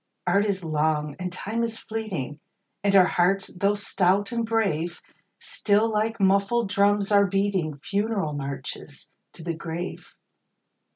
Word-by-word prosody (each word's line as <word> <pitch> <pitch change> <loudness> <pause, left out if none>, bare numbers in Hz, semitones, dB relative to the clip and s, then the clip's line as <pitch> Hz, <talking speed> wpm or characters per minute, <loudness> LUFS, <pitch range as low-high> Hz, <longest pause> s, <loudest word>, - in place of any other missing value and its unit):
Art 200 +3 +3
is 195 -3 -1
long, 150 -2 0
and 180 0 -3
Time 215 +5 -3
is 230 -1 -1
fleeting, 190 - -4 0.4
And 200 -1 +3
our 185 -2 +8
hearts, 195 +3 +1
though 200 +3 +1
stout 200 0 +1
and 235 -1 0
brave, 175 -7 0 0.4
Still, 210 +1 +1
like 220 +1 -1
muffled 200 +3 +2
drums, 200 0 +2
are 200 -1 +5
beating 190 -6 0
Funeral 200 0 -1
marches 140 -1 -6 0.2
to 165 - -10
the 170 0 -2
grave. 170 +2 -6
195 Hz, 135 wpm, -25 LUFS, 170-205 Hz, 0.4 s, our